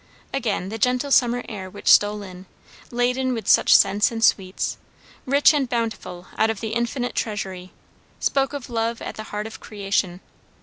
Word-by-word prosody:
Again 220 -8 -1
the 225 +2 -6
gentle 250 +4 +1
summer 245 -2 +3
air 190 -4 -7
which 205 +2 -11
stole 205 0 +5
in, 185 -1 -11 0.4
laden 250 +1 0
with 225 - -6
such - - +6
scents 205 +4 +4
and 225 -1 -3
sweets, 190 -3 +1 0.5
rich 280 +4 +5
and 275 -4 0
bountiful 225 -7 -3
out 220 - +4
of 225 -3 -2
the 220 - -4
infinite 235 +2 -2
treasury, 190 -4 -4 0.5
spoke 275 0 0
of 280 -4 -6
love 230 -1 -2
at - - -5
the 215 - -8
heart 210 0 -5
of 220 - -8
creation. 195 -3 -2
225 Hz, 170 wpm, -23 LUFS, 200-245 Hz, 0.5 s, such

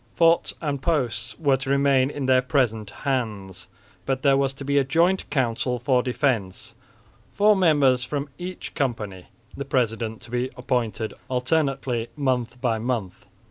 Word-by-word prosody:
Forts 165 0 +3
and 145 -3 -2
posts 125 -7 -1
were 140 -4 +2
to 130 +1 -5
remain 140 -1 +3
in 145 -2 -4
their 130 -1 +4
present 120 -5 0 0.2
hands, 110 -8 -2 0.4
but 135 -1 -1
there 140 -2 +5
was 135 -1 +1
to 135 - -8
be 140 +1 +3
a - - +3
joint 170 +7 +1
council 125 -2 0
for 125 +1 +2
defence, 120 -5 -1 0.6
four 210 +1 +5
members 145 -9 +3
from 140 +2 -3
each 180 +1 -6
company, 105 - -3 0.3
the 140 - -4
president 115 -4 -1
to 120 - -13
be 125 +1 -1
appointed 115 -3 -2 0.2
alternately 130 -3 0
month 125 -4 -1
by 120 -3 0
month. 110 -6 -3
130 Hz, 150 wpm, -24 LUFS, 120-140 Hz, 0.6 s, there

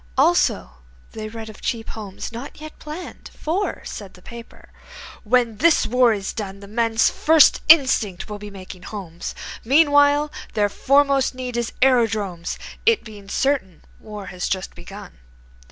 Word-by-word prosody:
Also, - - +2 0.4
they 215 -1 -6
read 225 0 -8
of 215 -2 -12
Cheap 230 -2 -3
Homes, 205 -2 -7
not 240 +6 -8
yet 310 0 -10
planned; 310 +4 -9
For, 360 +6 -2
said 200 -3 -8
the 180 - -18
paper, 235 0 -12 0.5
"When 235 -1 +2
this 330 +6 +4
war 250 0 +4
is 200 -3 -3
done 200 -3 -6
The 200 - -11
men's 225 +1 +2
first 315 -1 +5
instinct 260 - +4
will 210 -1 -7
be 210 0 -8
making 190 -2 -10
homes. 180 -4 -7 0.3
Meanwhile 290 +2 +4 0.2
their 205 -1 +2
foremost 275 +2 +2
need 250 -1 -5
is 235 -1 -2
aerodromes, 215 -9 +1 0.3
It 460 -2 +3
being 205 -3 -12
certain 260 - -1 0.2
war 210 -2 -9
has 180 - -3
just 190 0 -3
begun. 85 -6 -11
225 Hz, 150 wpm, -22 LUFS, 200-275 Hz, 0.5 s, first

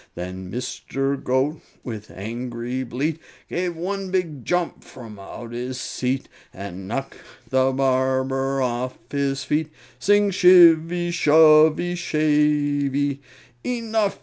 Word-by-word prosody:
Then 90 +1 -6
Mr. 135 +3 -3
Goat, 135 +5 0 0.2
with 110 -3 -7
angry 120 +4 -5
bleat, 145 +6 -2 0.3
Gave 175 -1 -2
one 195 +2 -3
big 170 -8 -2
jump 175 +3 -1
from 110 -5 -12
out 115 +4 -9
his 125 +2 -5
seat, 130 +2 -2 0.2
And 95 -1 -8
knocked 135 +6 -4 0.3
the 130 0 +3
barber 135 0 0
off 125 +1 -2
his 140 -1 -1
feet 150 +3 -1 0.3
Sing 205 0 +3
shivvy, 175 -2 +5
shovvy, 155 +1 +5
shavey! 145 -3 +1 0.4
"Enough!" 225 -4 -1
140 Hz, 110 wpm, -23 LUFS, 125-165 Hz, 0.4 s, shivvy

